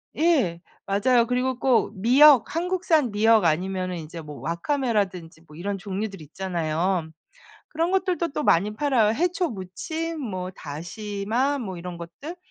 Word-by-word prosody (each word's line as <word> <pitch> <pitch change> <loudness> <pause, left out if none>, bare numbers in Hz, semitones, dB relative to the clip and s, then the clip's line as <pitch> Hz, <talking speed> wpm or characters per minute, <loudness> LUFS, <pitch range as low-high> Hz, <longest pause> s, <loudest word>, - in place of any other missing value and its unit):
예. 265 - +2 0.2
맞아요. 230 +4 +3
그리고 250 0 0
꼭 245 -5 +2
미역 265 +5 +6
한국산 340 - +1
미역 215 -1 +4
아니면은 185 +2 0
인제 165 +1 -8
뭐 150 -2 -10
와카메라든지 190 - -2
뭐 150 - -14
이런 195 +4 -3
종류들 195 -1 -5
있잖아요. 170 +1 -2 0.6
그런 330 +3 -1
것들도 365 -3 0
또 300 - -3
많이 210 +1 +3
팔아요, 235 -5 +2
해초무침 325 - -3
뭐 185 -7 -4
다시마 205 - -3
뭐 190 -7 -5
이런 175 0 -7
것들. 275 - -8
210 Hz, 295 characters per minute, -25 LUFS, 180-285 Hz, 0.6 s, 미역